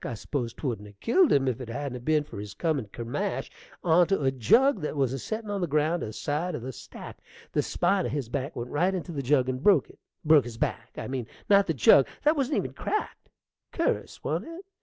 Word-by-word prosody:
I 120 - -4
s'pose 120 +1 -3
'twouldn't 115 -7 -4
'a' 105 - -14
killed 290 - +3
him 135 -1 +3
if 130 0 -1
it 120 - -7
hadn't 135 +1 -4
'a' - - -5
ben 150 +4 +1
for 145 - -9
his 100 -1 -7
comin' 155 -9 -1
kermash 140 - -3 0.3
onto 175 0 +3
a 135 - +3
jug 210 - +3
that 150 - -3
was 135 -2 +1
a 135 - -3
settin' 220 - -4
on 200 -1 -2
the 175 - 0
ground 155 +3 +1
aside 150 +10 -2
o' - - -4
the 130 +3 -6
stack. - - -10 0.3
The - - +2
spine - - +1
of - - -4
his 140 -3 -2
back 140 +3 -4
went 120 +1 -5
right 180 +6 +1
onto 175 -1 -5
the 140 - -2
jug 130 -1 +2
and 130 0 -2
broke 185 -5 +4
it, - - -25 0.3
broke 150 -4 +6
his 120 -2 -8
back, - - -3
I - - -4
mean, 130 -3 -4 0.2
not 200 0 +6
the 165 - 0
jug: 130 +3 +6 0.2
that 305 +2 +4
wa'n't 275 -1 0
even - - -2
cracked. 425 - -4 0.4
Cur'us, - - -2
wa'n't - - -2
it? 335 +4 -9
145 Hz, 230 wpm, -27 LUFS, 125-180 Hz, 0.4 s, broke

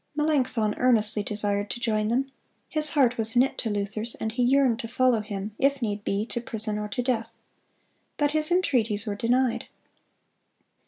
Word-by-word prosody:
Melanchthon 265 -8 0
earnestly 220 -4 +2
desired 205 -1 -1
to - - -5
join 215 -3 -1
them. 250 +4 0 0.4
His 305 -1 +3
heart 255 -6 +2
was 225 +2 +8
knit 255 +2 +3
to 225 - -2
Luther's, 205 +2 -2
and 220 - -4
he 245 +3 -3
yearned 255 -2 +2
to 230 - -5
follow 250 0 +2
him, 205 -1 -6
if 280 0 +2
need 210 -4 -3
be, 200 +1 -1
to 240 0 -5
prison 215 -2 -3
or 210 - -4
to 245 +4 -3
death. 230 -2 -2 0.8
But 290 -1 +1
his 310 0 0
entreaties 240 - 0
were 210 - -3
denied. 240 +3 0
230 Hz, 170 wpm, -25 LUFS, 210-255 Hz, 0.8 s, was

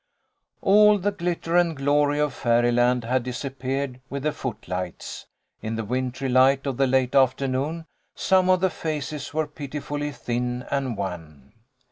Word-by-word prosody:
All 210 +1 +6
the 205 +1 0
glitter 175 -3 -2
and 170 -3 +3
glory 145 +1 +2
of 150 -2 +1
fairy 120 0 +2
land 120 0 +2
had 125 +2 0
disap 130 +2 -5
peared 130 0 -3
with 140 0 -4
the 155 - +1
footlights. 105 - -5 0.3
In 110 +1 -3
the 110 -1 -3
wintry 130 +3 -2
light 130 +2 +4
of 135 -3 -2
the 135 - +3
late 130 -1 +2
afternoon, 135 +4 +1 0.3
some 185 -1 +3
of 185 -1 +4
the 190 -1 +2
faces 150 -3 -4
were 155 0 0
pitifully 145 0 -5
thin 125 -1 -3
and 135 -5 -1
wan. 80 -8 -7
135 Hz, 155 wpm, -24 LUFS, 125-150 Hz, 0.3 s, All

